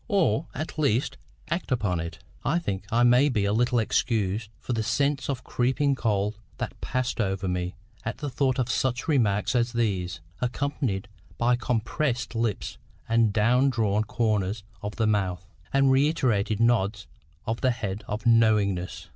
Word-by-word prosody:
or, 185 - +2
at 155 +2 -5
least, 140 -3 +1 0.4
act 170 -3 -2
upon 100 -8 +1
it?" 85 0 -5 0.3
I 170 - +2
think 100 - -3
I 120 +2 +3
may 125 +4 +5
be 105 -6 +1
a 100 - +1
little 120 +2 +2
excused 110 -2 0
for 125 - -4
the 115 - 0
sense 140 +5 0
of 130 -2 -2
creeping 130 +3 +1
cold 105 -4 0 0.2
that - - -5
passed 125 -2 -1
over 95 -1 -1
me 90 0 -2 0.3
at 115 - -3
the 145 - -4
thought 130 -1 0
of 125 -3 +1
such 125 +1 -1
remarks 115 -7 +2
as 120 0 +1
these, 95 -6 -1 0.2
accompanied 125 -5 -1 0.3
by 120 +1 +3
compressed 120 +1 -1
lips 115 -3 -2 0.3
and 115 -1 +3
down 120 +6 +3
drawn 110 -4 +1
corners 105 -2 0 0.2
of 105 +1 -5
the 110 - +1
mouth, 95 -4 0 0.3
and 135 -1 +4
reiterated 130 -8 +2
nods 115 -4 +2 0.4
of 115 +2 -2
the 130 - +3
head 105 -5 -3
of 105 +2 -4
KNOWINGNESS. 100 -6 +2
115 Hz, 160 wpm, -26 LUFS, 100-130 Hz, 0.4 s, may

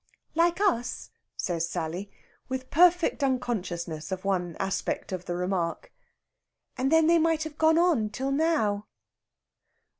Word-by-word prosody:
"Like 340 +2 +2
us?" 360 - 0 0.3
says 170 -2 -1
Sally, 175 +4 -4 0.4
with 260 0 -4
perfect 350 -2 +4
unconsciousness 185 - -2
of 185 0 -4
one 180 -4 -1
aspect 195 0 -2
of 180 -1 -4
the 175 - -3
remark. 180 - -2 0.8
"And 265 +2 0
then 320 0 +5
they 335 +1 +5
might 325 -1 +2
have 315 -1 -8
gone 320 0 +5
on 330 -12 +3
till 265 +6 -3
now." 275 -10 +1
245 Hz, 130 wpm, -27 LUFS, -, 0.8 s, then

